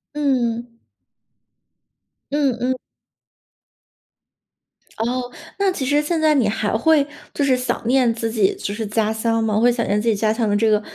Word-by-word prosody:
嗯。 240 -5 -1 1.6
嗯， 285 -3 +1
嗯 255 +1 +1 2.2
哦， 245 +2 -2 0.3
那 395 -1 +2
其 280 -7 -3
实 290 +3 +2
现 320 +2 -1
在 310 -1 +4
你 250 -6 +3
还 210 0 -1
会 295 +4 +3 0.3
就 290 - -1
是 265 -2 +3
想 250 -1 -2
念 250 -2 +3
自 225 0 -3
己 215 -4 +2
就 200 - -4
是 220 0 -3
家 215 +1 0
乡 225 0 0
吗？ 215 -1 +1
会 245 +2 +4
想 235 -1 -1
念 205 - +1
自 220 - -3
己 225 - +4
家 215 +1 +1
乡 225 0 0
的 205 - +1
这 220 +2 +2
个， 210 -1 +3
235 Hz, 180 characters per minute, -21 LUFS, 220-270 Hz, 2.2 s, 在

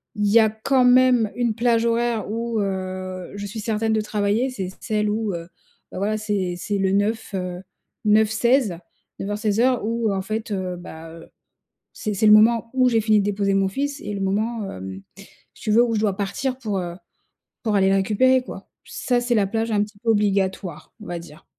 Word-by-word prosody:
il 210 0 0
y 225 +3 +6
a 220 -1 +4
quand 250 +4 +1
même 250 -3 +5
une 240 -3 0
plage 235 -1 +2
horaire 230 -2 0
où, 230 0 -2
heu, 185 -2 -4
je 200 0 -5
suis 215 +2 -6
certaine 220 +1 0
de 215 - +2
travailler, 210 +4 0
c'est 190 -8 -4
celle 210 -1 0
où, 215 -2 -1
heu, 170 0 -6 0.4
bah, - - -8
voilà, 215 +2 0
c'est 200 -4 -2
c'est 205 +3 -2
le 190 0 +1
9, 205 +2 0
heu, 180 -1 -4 0.4
9-16, 220 0 +3 0.4
9:00-16:00 210 +4 0
ou 230 -1 0
en 190 - -1
fait, 215 +2 -4
heu, 185 -2 -2
bah, 165 -2 -10
heu, 165 - -13 0.6
c'est 215 -2 -3
c'est 200 - 0
le 210 - +7
moment 230 +1 +5
où 255 -1 +4
j'ai 225 -2 +2
fini 215 -1 +3
de 200 - 0
déposer 200 -1 0
mon 195 0 +2
fils 280 +7 -3
et 210 - -5
le 195 - -4
moment, 210 +2 -1
hem, 95 +1 -7 0.5
si - - -16
tu 215 - 0
veux 235 +3 +6
où 235 -2 0
je - - +1
dois 205 -3 +1
partir 230 +6 -2
pour, 210 -6 -3
heu, 175 -1 -5 0.7
pour 215 -3 0
aller 190 -1 +4
le 195 - +3
récupérer 250 +7 +3
quoi. - - -10 0.2
Ça 245 -1 -1
c'est 245 0 0
la 205 -3 +3
plage 225 +1 -1
un 205 -1 +2
petit 210 0 -7
peu 230 +1 0
obligatoire 195 -6 0
on - - -10
va 175 -1 -4
dire. 160 -2 -13
210 Hz, 205 wpm, -22 LUFS, 195-230 Hz, 0.7 s, le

